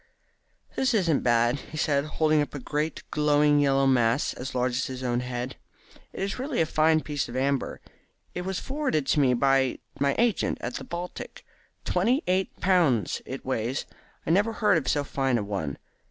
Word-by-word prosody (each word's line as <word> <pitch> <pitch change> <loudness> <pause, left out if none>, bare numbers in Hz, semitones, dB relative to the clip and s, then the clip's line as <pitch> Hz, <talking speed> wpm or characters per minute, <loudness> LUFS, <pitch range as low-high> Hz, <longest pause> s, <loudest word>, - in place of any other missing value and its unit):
"This 260 -3 +1
isn't 170 -8 +2
bad," 120 +2 +2
he 155 - -10
said, 145 -2 +1
holding 155 0 +2
up 145 - -4
a - - -4
great 150 +4 -3
glowing 150 0 +3
yellow 135 -1 +3
mass 125 0 +2
as 130 +2 -7
large 125 0 +1
as 125 +2 -1
his 130 0 -6
own 120 -1 0
head. 125 +1 -4 0.5
"It - - -5
is 195 +5 -3
really 270 0 -3
a 160 - +4
very - - -14
fine 155 0 +4
piece 145 -4 -3
of 120 - -7
amber. 135 0 -1 0.5
It 180 - -3
was 190 +1 -3
forwarded 265 - -1
to 145 - +2
me 130 -3 +4
by 135 0 +2 0.2
my 140 0 +2
agent 235 -3 +1
at 120 - -4
the - - -7
Baltic. 175 +1 -7 0.4
Twenty 235 - +1
eight 185 +1 -1
pounds, 160 - +2
it 130 +1 -6
weighs. 125 0 -2 0.4
I - - 0
never 205 +6 +3
heard 210 -6 +3
of 135 - -9
so 145 - +1
fine 135 -3 0
a 105 - -1
one. 100 -9 -3
145 Hz, 190 wpm, -26 LUFS, 130-170 Hz, 0.5 s, a